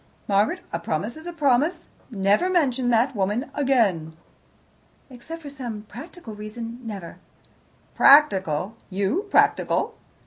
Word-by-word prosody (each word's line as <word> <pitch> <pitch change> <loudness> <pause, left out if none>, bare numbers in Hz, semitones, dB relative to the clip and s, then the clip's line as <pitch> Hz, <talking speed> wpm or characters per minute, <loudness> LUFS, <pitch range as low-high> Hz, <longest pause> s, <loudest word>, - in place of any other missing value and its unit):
Margaret, 200 +1 +1
a 170 - -1
promise 170 +7 -3
is 315 +2 -10
a - - -4
promise. 305 +2 +1 0.2
Never 205 - +2
mention 265 -9 +1
that 240 +3 +2
woman 210 +7 -1
again." 200 - +1 0.9
"Except 320 +7 -9
for 285 - -7
some 240 -7 -6
practical 250 - -10
reason 225 +3 -7
never." 200 -8 -7 0.8
"Practical! 195 - +4
You 200 - -1
practical!" - - +2
235 Hz, 115 wpm, -24 LUFS, 200-285 Hz, 0.9 s, Practical